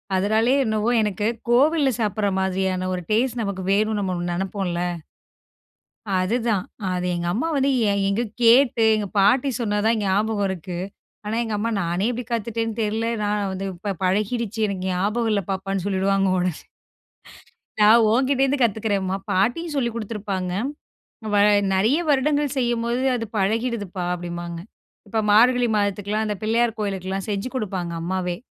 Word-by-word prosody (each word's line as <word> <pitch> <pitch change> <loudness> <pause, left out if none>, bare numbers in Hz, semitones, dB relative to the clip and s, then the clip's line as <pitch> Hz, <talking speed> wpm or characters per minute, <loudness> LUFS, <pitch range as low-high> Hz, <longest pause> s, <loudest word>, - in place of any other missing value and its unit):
அதனாலே 220 +6 +2
என்னவோ, 220 +1 0
எனக்கு 210 -1 -1 0.2
கோவில்ல 285 +3 +4
சாப்புட்ற 210 -1 0
மாதிரியான 190 -1 -1
1 180 - -3
டேஸ்ட் 240 +2 +1
நமக்கு 200 -3 -3
வேணுனு 215 +1 +1
நம்ம 185 -2 -1 0.2
நெனைப்போம்ல. 185 -1 -2 1.4
அதுதான். 205 +2 0 0.3
அது 180 0 -2
எங்க 175 0 -3
அம்மா 245 - -1
வந்து 275 0 +2 0.2
எ - - +2 0.2
எங்கோ 215 +5 0 0.2
கேட்டு 235 0 +5
எங்க 210 -1 -2
பாட்டி 245 +8 +4
சொன்ன 210 -2 0
தான் 225 0 +3
ஞாபகம் 205 +1 +1
இருக்கு. 180 -1 -5 0.5
ஆனா 215 +2 -2
எங்க 220 -2 -3
அம்மா 225 +3 -1
"நானே 175 +4 -1
எப்பிடி 245 0 -4
காத்துட்டேன்னு 225 0 -2
தெரில. 220 +2 -1 0.2
நான் 205 -1 0
வந்து 190 +1 -4
ப - - -5
இப்ப 195 +3 -4
பழகிடுச்சு. 215 +3 -1
எனக்கு 190 -2 -4
ஞாபகம் 210 +6 0
இல்ல 200 -2 +1
பாப்பான்னு" 195 -1 -2
சொல்லிடுவாங்க 195 0 +1
ஒடனே 180 0 +1 1.3
"நான் 220 +2 +7
ஓங்கிட்டேருந்து 270 +2 +2
கத்துக்கிறேன்ம்மா, 200 -4 0
பாட்டியும் 290 - 0
சொல்லிக் 235 -4 -1
குடுத்திருப்பாங்க. 200 -4 -4 0.8
வ - - +4 0.4
நெறைய 220 +10 +3
வருடங்கள் 290 0 +1
செய்யும்போது 240 0 0
அது 230 -1 -4
பழகிடுது 220 +1 0
பா" 180 - -2
அப்டீன்பாங்க. 175 -1 -6 0.5
இப்போ 220 +2 0
மார்கழி 245 +3 +5
மாதத்துக்கெல்லாம் 205 +1 -1
அந்த 210 - -1
பிள்ளையார் 225 +1 +1
கோவிலுக்கெல்லாம் 195 -1 -3
செஞ்சு 200 +3 -2
குடுப்பாங்க 190 -8 -3
அம்மாவே. 180 0 -2
210 Hz, 140 wpm, -23 LUFS, 190-235 Hz, 1.4 s, நான்